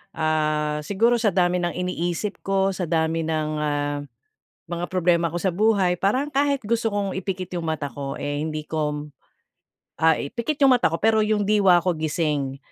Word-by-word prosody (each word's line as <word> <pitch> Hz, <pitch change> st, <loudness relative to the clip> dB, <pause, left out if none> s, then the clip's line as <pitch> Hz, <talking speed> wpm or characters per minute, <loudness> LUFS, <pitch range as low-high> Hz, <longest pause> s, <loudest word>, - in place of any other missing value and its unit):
ah, 155 Hz, -1 st, 0 dB
siguro 230 Hz, +8 st, +2 dB
sa 215 Hz, -3 st, +2 dB
dami 180 Hz, -1 st, +2 dB
ng 175 Hz, -1 st, -2 dB
iniisip 180 Hz, +2 st, -2 dB
ko, 195 Hz, 0 st, +1 dB
sa 180 Hz, -3 st, -3 dB
dami 160 Hz, 0 st, 0 dB
ng, 155 Hz, -1 st, -1 dB
ah, 145 Hz, -1 st, -1 dB, 0.7 s
mga 175 Hz, +1 st, -2 dB
problema 175 Hz, -2 st, +2 dB
ko 165 Hz, -, -6 dB
sa 185 Hz, +1 st, 0 dB
buhay 195 Hz, -2 st, +2 dB
parang 260 Hz, +9 st, 0 dB
kahit 280 Hz, -1 st, +1 dB
gusto 225 Hz, +1 st, 0 dB
kong 205 Hz, -2 st, -1 dB
ipikit 185 Hz, -1 st, -4 dB
yung 165 Hz, -, -5 dB
mata 150 Hz, -3 st, -2 dB
ko, 140 Hz, +2 st, -5 dB
eh, 145 Hz, 0 st, -3 dB
hindi 155 Hz, 0 st, -3 dB
ko 150 Hz, -1 st, -2 dB, 1.0 s
ah, 160 Hz, -1 st, +5 dB
ipikit 235 Hz, -, -3 dB
yung 270 Hz, -, +7 dB
mata 245 Hz, -, +4 dB
ko 165 Hz, -, -2 dB
pero 220 Hz, +3 st, +3 dB
yung 210 Hz, -1 st, +1 dB
diwa 200 Hz, -3 st, +5 dB
ko 180 Hz, -, +2 dB
gising 150 Hz, -4 st, -1 dB
175 Hz, 175 wpm, -23 LUFS, 155-205 Hz, 1.0 s, yung